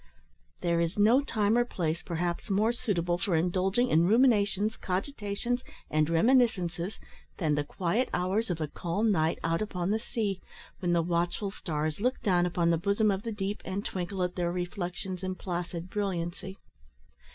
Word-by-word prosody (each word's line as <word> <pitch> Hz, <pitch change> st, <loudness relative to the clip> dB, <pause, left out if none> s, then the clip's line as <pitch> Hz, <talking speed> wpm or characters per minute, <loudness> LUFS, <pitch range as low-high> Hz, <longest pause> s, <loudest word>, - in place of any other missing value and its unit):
There 170 Hz, -1 st, +2 dB
is 170 Hz, +3 st, -1 dB
no 225 Hz, +6 st, +5 dB
time 215 Hz, -4 st, +1 dB
or 240 Hz, -, +4 dB
place, 170 Hz, -8 st, -2 dB
perhaps, 175 Hz, +4 st, -3 dB
more 210 Hz, +4 st, +3 dB
suitable 175 Hz, -8 st, -1 dB
for 185 Hz, -2 st, 0 dB
indulging 185 Hz, +8 st, +2 dB
in 165 Hz, +2 st, +5 dB
ruminations, 215 Hz, -2 st, +3 dB
cogitations, 205 Hz, +3 st, -2 dB, 0.3 s
and 155 Hz, 0 st, +2 dB
reminiscences, 185 Hz, -2 st, +2 dB, 0.4 s
than 155 Hz, -5 st, +1 dB
the 145 Hz, 0 st, +1 dB
quiet 185 Hz, -, -1 dB
hours 190 Hz, +5 st, 0 dB
of 175 Hz, -2 st, -1 dB
a 155 Hz, -, -1 dB
calm 200 Hz, +9 st, 0 dB
night 160 Hz, -4 st, +2 dB
out 165 Hz, +2 st, +1 dB
upon 185 Hz, -3 st, -1 dB
the 220 Hz, -, +1 dB
sea, 210 Hz, -4 st, -2 dB, 0.4 s
when 175 Hz, -2 st, +1 dB
the 170 Hz, -1 st, +3 dB
watchful 175 Hz, +4 st, -1 dB
stars 155 Hz, -2 st, -3 dB
look 250 Hz, +3 st, +1 dB
down 180 Hz, -3 st, +3 dB
upon 170 Hz, -1 st, +1 dB
the 165 Hz, -, +2 dB
bosom 200 Hz, +3 st, +2 dB
of 195 Hz, 0 st, -1 dB
the 230 Hz, -, -4 dB
deep, 205 Hz, -1 st, -3 dB
and 195 Hz, +2 st, -4 dB
twinkle 185 Hz, +1 st, -2 dB
at 180 Hz, 0 st, -2 dB
their 175 Hz, -1 st, 0 dB
reflections 180 Hz, +1 st, -4 dB
in 185 Hz, -1 st, -3 dB
placid 175 Hz, -1 st, -4 dB
brilliancy. 190 Hz, -1 st, -3 dB
185 Hz, 165 wpm, -29 LUFS, 170-210 Hz, 0.4 s, no